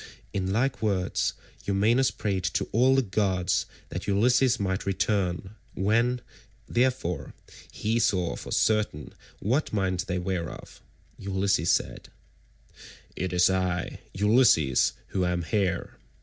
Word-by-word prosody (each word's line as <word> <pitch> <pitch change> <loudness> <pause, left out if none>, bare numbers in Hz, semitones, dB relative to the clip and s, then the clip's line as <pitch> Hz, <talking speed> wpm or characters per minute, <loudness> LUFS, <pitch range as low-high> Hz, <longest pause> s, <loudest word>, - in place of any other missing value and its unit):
In 95 -1 -1
like 125 +5 0
words 100 -4 0 0.3
Eumaeus 110 +6 +3
prayed 95 -3 -2
to - - 0
all 130 +4 +4
the 135 - +3
gods 95 -4 0 0.2
that - - -6
Ulysses 125 +5 +3
might 95 -1 -2
return; 95 0 0 0.2
when, 115 +5 +1 0.5
therefore, 120 - -1 0.4
he 115 +2 -1
saw 90 -6 +1
for - - -8
certain 105 -9 0 0.3
what 130 +9 0
mind 95 -3 -1
they 90 - -1
were 90 -2 -2
of, - - -12 0.4
Ulysses 95 -3 0
said, - - 0 1.1
"It 95 0 -3
is 90 0 +4
I, 90 -1 -1 0.2
Ulysses, 105 - +4 0.2
who 95 - -1
am 90 -1 0
here. 95 +2 -1
100 Hz, 120 wpm, -27 LUFS, 90-110 Hz, 1.1 s, all